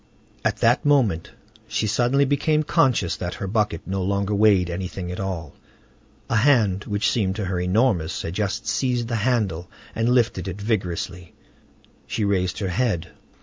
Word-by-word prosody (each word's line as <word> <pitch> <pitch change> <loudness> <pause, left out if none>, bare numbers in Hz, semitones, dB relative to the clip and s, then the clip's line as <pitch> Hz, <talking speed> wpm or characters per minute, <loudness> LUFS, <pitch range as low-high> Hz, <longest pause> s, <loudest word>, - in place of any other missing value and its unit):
At - - 0
that 120 +4 +3
moment 130 - +2 0.4
she - - -1
suddenly 125 +6 +2
became 150 +3 +1
conscious 130 - +2
that 85 -1 -4
her - - -5
bucket 105 -4 -1
no 95 +1 -2
longer 100 +2 0
weighed 100 -3 +4
anything 90 0 -5
at 90 - -6
all: 90 -6 -4 0.7
a 115 - +1
hand, 110 -6 +3
which 100 0 0
seemed 95 -5 0
to 105 -2 -3
her 90 -1 -2
enormous, 90 -2 +1
had 80 - -4
just 105 +2 -2
seized 125 -1 0
the 120 - 0
handle, 105 -8 0 0.2
and 115 +1 0
lifted 115 -7 +1
it 95 +1 -5
vigorously. 90 -4 -3 0.7
She 110 - -1
raised 90 -2 0
her 95 -3 -2
head. 100 -3 -1
100 Hz, 160 wpm, -23 LUFS, 90-120 Hz, 0.7 s, weighed